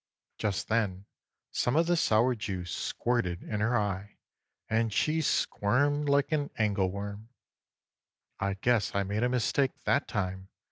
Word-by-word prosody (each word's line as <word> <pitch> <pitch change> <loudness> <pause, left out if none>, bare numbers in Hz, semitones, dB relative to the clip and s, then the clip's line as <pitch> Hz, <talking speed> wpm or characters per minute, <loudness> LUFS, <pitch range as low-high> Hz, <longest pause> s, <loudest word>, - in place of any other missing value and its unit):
Just 100 -3 -1
then 100 -4 0 0.5
some 120 - 0
of 165 +2 +4
the 175 +1 +2
sour 120 -5 +3
juice 95 -6 -4
squirted 115 -8 -1
in 105 - -3
her 115 +3 +2
eye 105 -1 -2 0.5
and 115 0 +1
she 155 +9 +1
squirmed 145 +3 +1
like 140 +2 +3
an 145 -2 0
angle 100 -3 +1
worm. 100 +3 -6 1.1
"I 100 0 0
guess 110 0 +1
I 100 - +2
made 100 +3 -2
a 125 - +2
mistake 125 +2 +1
that 140 - +2
time!" 95 -2 -3
110 Hz, 145 wpm, -30 LUFS, 100-125 Hz, 1.1 s, of